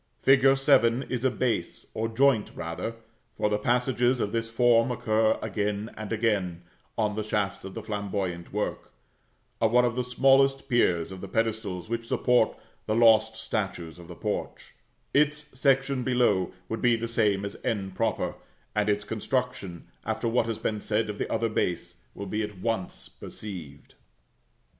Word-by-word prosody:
Fig. 135 -1 +5
7 130 -3 +4
is 125 -1 -2
a 130 - +4
base, 115 -7 -2
or 110 +1 -1
joint 115 -1 +2
rather 85 +7 -4 0.4
(for 105 0 +1
passages 125 +2 +2
of 100 - -1
this 115 0 -2
form 115 +1 +4
occur 110 -2 +2
again 105 +1 -2
and 110 0 -7
again, 100 -6 0 0.3
on 105 -1 +1
the 110 - -1
shafts 105 -2 -1
of 95 0 -8
flamboyant 100 -5 -3
work), - - -3 0.7
of 110 -1 +3
one 125 +1 +5
of 120 -1 0
the 125 - 0
smallest 135 +2 +3
piers 95 - +2
of 95 - -8
the 100 - -6
pedestals 110 -4 -2
which 115 0 -3
support 125 -2 +2 0.3
the 110 - +1
lost 110 -1 +5
statues 95 -7 -4
of 85 - -12
the 90 - -9
porch; 105 +3 -4 0.4
its 150 +1 +2
section 135 -1 +2
below 120 -7 +2 0.2
would 115 - -4
be 120 -1 +4
the 115 0 -3
same 105 -4 +1
as 100 - -5
[=n], 95 -4 -2 0.8
and 105 0 +1
its 105 0 +1
construction, 110 -5 -3 0.2
after - - -2
what 115 0 +2
has 115 -2 -2
been 105 -1 -2
said 110 0 0
of 105 - -10
the - - -2
other 115 - +1
base, 85 -5 -1 0.2
will 100 - -6
be 105 +3 -2
at 105 -2 -5
once 105 -1 -3
perceived. 80 -10 -9
110 Hz, 160 wpm, -27 LUFS, 100-120 Hz, 0.8 s, Fig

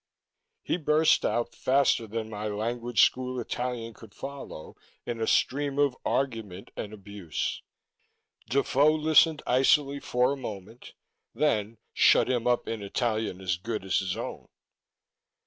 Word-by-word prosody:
He - - 0
burst 155 -1 +3
out, 120 0 -1
faster 130 -1 +2
than 110 +1 -4
my 105 -1 -5
language 115 +3 +1
school 130 0 +1
Italian 120 -1 -4
could 110 -1 -15
follow, 135 - -8 0.3
in 115 -1 -4
a 110 - 0
stream 140 +1 +1
of 145 -3 +2
argument 110 -8 -2
and 105 - -5
abuse. 100 -5 -5 0.9
Defoe 140 +3 +3
listened 155 0 +4
icily 140 +2 +3
for 125 -1 +1
a - - -5
moment, 110 -2 -9 0.4
then 110 -7 0 0.2
shut - - +5
him 125 -1 0
up 120 -1 +1
in 115 -2 -3
Italian 110 -2 -2
as 90 -2 -1
good 110 +2 -4
as 95 - +2
his 95 -2 -3
own. - - -6
120 Hz, 135 wpm, -28 LUFS, 105-135 Hz, 0.9 s, shut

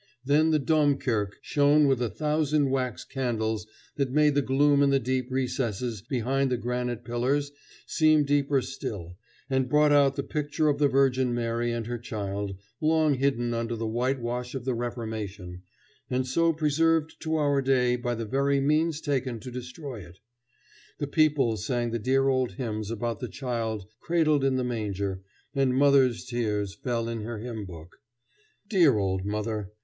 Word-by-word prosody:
Then 150 +3 +4
the 155 - +3
Domkirke 140 -9 +1
shone 145 +1 +4
with 135 -3 +2
a 120 - 0
thousand 150 +4 +1
wax 130 -3 -1
candles 110 -5 -2 0.3
that 140 -2 0
made 150 +2 +3
the 145 - +2
gloom 140 +2 +3
in 140 - +4
the 140 - +4
deep 130 0 -2
recesses 125 -4 -2
behind 130 +3 0
the 125 - 0
granite 120 0 -3
pillars 130 +4 0 0.3
seem 155 -2 +4
deeper 140 -1 +1
still, 100 -9 -6 0.3
and 130 -2 0
brought 150 +2 +4
out 140 -2 +4
the 140 - -2
picture 150 +1 -1
of 145 -1 0
the 145 - +5
Virgin 130 -2 +2
Mary 120 0 -1
and 115 -1 -3
her 120 +1 -4
child, 100 -3 -4 0.2
long 155 -1 +3
hidden 125 -3 0
under 115 0 -2
the 115 0 -3
whitewash 125 +1 -2
of 130 -2 -5
the 130 - 0
Reformation, 110 -6 -5 0.5
and 130 +1 0
so 165 +6 +2
preserved 160 +1 +1
to 160 0 -1
our 145 -2 +2
day 125 -2 +2
by 120 0 -2
the 115 0 -4
very 140 +4 +1
means 155 +2 +1
taken 130 -5 -1
to 125 - -8
destroy 125 +1 -7
it. 90 -2 -13 0.8
The 145 - -2
people 140 -6 +2
sang 120 0 -1
the 115 - -2
dear 135 +4 +2
old 130 -2 +1
hymns 110 -5 -4
about 115 -1 -3
the - - -5
child 115 -6 -3
cradled 155 -4 +2
in 135 -1 +2
the 130 - 0
manger, 100 -5 -3 0.3
and 135 -2 +2
mother's 135 -3 +4
tears 105 -5 -2
fell 115 +2 -2
in 115 -1 -3
her 115 +1 -5
hymn 110 -1 -6
book. 85 -1 -11 0.7
Dear 170 - +4
old 95 -1 -1
mother! 105 -1 -3
125 Hz, 165 wpm, -27 LUFS, 115-140 Hz, 0.8 s, the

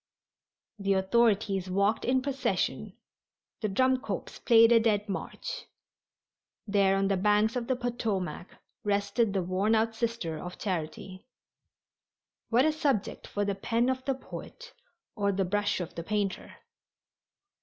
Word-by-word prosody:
The 195 0 +1
authorities 195 -1 +2
walked 200 +4 +1
in 255 +1 +2
procession, 275 -1 -2 0.6
the 215 - 0
drum 260 +6 +3
corps 280 - -5
playing 230 -1 +7
a 235 - +7
dead 215 -2 +1
march. 195 - -5 1.0
There 200 -2 +3
on 195 0 +1
the 195 -1 +1
banks 210 +4 +2
of 240 -2 -2
the 260 - +1
Potomac 225 -7 -3 0.4
rested 205 +2 +1
the 195 -2 0
worn 190 +5 +1
out 225 +1 +1
Sister 225 -9 -2
of 180 0 -7
Charity. 185 +2 -5 1.2
What 245 +4 +4
a 315 - +4
subject 280 -9 -1
for 205 0 -2
the 200 - 0
pen 230 +5 0
of 260 0 -1
the 270 - 0
poet - - -10 0.4
or 200 -2 +1
the 195 0 0
brush 205 +2 0
of 175 - -5
the 170 - -5
painter! 205 0 -2
210 Hz, 140 wpm, -29 LUFS, 195-235 Hz, 1.2 s, playing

